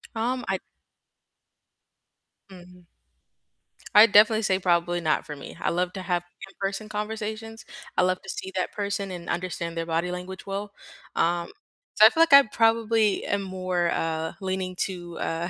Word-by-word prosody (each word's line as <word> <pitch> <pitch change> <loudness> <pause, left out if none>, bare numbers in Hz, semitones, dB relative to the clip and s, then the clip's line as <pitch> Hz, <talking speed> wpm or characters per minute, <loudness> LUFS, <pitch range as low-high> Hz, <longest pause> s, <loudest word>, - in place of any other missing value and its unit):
Um, 245 +3 -1
I 190 -1 0 1.9
Mhm. 180 -1 -15 1.1
I'd 215 +1 +8
definitely 215 +2 +6
say, 190 -2 +1
probably 175 -1 +1
not 155 -2 0
for 150 - -7
me. 140 - -10
I - - 0
love 180 +1 -1
to 190 - -6
have 175 -1 -1 0.2
in-person 195 +2 -5
conversations, 220 +1 -5 0.3
I - - +5
love 185 0 +1
to 195 - -12
see 190 - -5
that 185 - -1
person 200 -1 -3
and 175 -2 -7
understand 170 -1 -3
their 165 - -2
body 165 +2 -1
language 180 +1 -7
well. 200 +1 -4 0.4
Um, 170 0 +1 0.5
so 215 - +8
I 220 - +10
feel 325 - +1
like 330 -3 +5
I 280 0 +10
probably 225 -2 +2
am 200 - 0
more, 185 -2 -1
uh, 160 0 -2
leaning 185 -1 -3
to, 175 -2 -8
uh, 165 +2 -2
190 Hz, 160 wpm, -25 LUFS, 175-210 Hz, 1.9 s, I